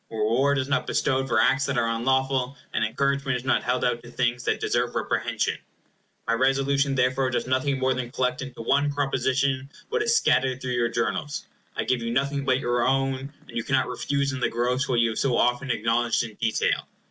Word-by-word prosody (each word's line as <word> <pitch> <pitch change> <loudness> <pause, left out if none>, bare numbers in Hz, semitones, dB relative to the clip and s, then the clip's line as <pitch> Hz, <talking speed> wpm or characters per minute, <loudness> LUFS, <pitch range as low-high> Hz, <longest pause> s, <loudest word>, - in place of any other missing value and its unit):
Reward 115 +6 +1
is 130 -1 -1
not 145 - 0
bestowed 135 -2 +1
for 120 -3 +2
acts 135 +4 +3
that 135 -2 -1
are 115 -1 +2
unlawful; 130 +3 0 0.2
and - - +1
encouragement 140 +3 0
is 125 - -8
not 130 - +2
held 125 - 0
out 120 -1 0
to 120 - -12
things 120 0 -1
that - - +1
deserve - - 0
reprehension. - - -1 0.7
My 115 - +2
Resolution 135 +2 +2
therefore 130 +1 +2
does 125 - -1
nothing 130 +2 0
more 130 0 +1
than 125 -2 -4
collect 125 0 -1
into 130 -3 -7
one 145 +4 +2
proposition 135 -1 0 0.2
what 470 0 0
is 460 +2 +2
scattered 130 - +2
through 130 -1 -4
your 120 -1 +1
Journals. 130 +5 -2 0.3
I - - -1
give 125 -2 0
you 115 - -3
nothing 140 +3 0
but 130 -1 +3
your 120 -2 0
own; 135 +1 0 0.2
and - - -13
you - - -1
cannot - - +1
refuse 140 0 -1
in 140 - -4
the - - +1
gross 125 +4 0
what 120 -2 +2
you 115 -1 +3
have 110 - -3
so 130 -3 +1
often 125 +3 +1
acknowledged 115 +1 +1
in 115 -2 -7
detail. 110 +1 0
130 Hz, 205 wpm, -25 LUFS, 120-135 Hz, 0.7 s, acts